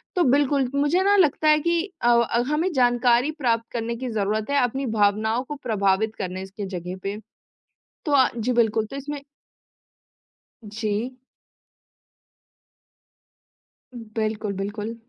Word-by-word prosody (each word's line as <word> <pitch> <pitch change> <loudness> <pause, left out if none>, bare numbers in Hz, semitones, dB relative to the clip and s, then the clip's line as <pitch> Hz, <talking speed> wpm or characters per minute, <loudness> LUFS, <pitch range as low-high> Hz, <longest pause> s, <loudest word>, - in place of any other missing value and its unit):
तो 360 - +3
बिल्कुल 280 -2 +2
मुझे 295 +7 +2
ना 405 +1 +4
लगता 310 -3 +3
है 305 0 +5
कि 340 +1 +1 0.2
अव, 235 0 +5 0.3
हमें 325 +5 0
जानकारी 245 +2 +3
प्राप्त 230 -3 +1
करने 235 0 -2
की 250 +1 -5
जरूरत 215 +1 -1
है 285 - +3
अपनी 265 +3 -1
भावनाओं 215 +4 +2
को 295 +3 -6
प्रभावित 215 -1 +1
करने 185 0 -4
स - - -21
के 205 - -3
जगह 180 +2 -6
पे। 200 +1 -3 0.9
तो 295 - -1
अ, 260 -2 +5
जी 235 +3 -1
बिल्कुल 220 -2 +2
तो - - -6
इसमें 285 +1 -5 1.4
जी। 215 +4 -3 3.0
बिल्कुल, 215 -1 -1
बिल्कुल। 210 +3 -4
235 Hz, 130 wpm, -24 LUFS, 215-280 Hz, 3.0 s, है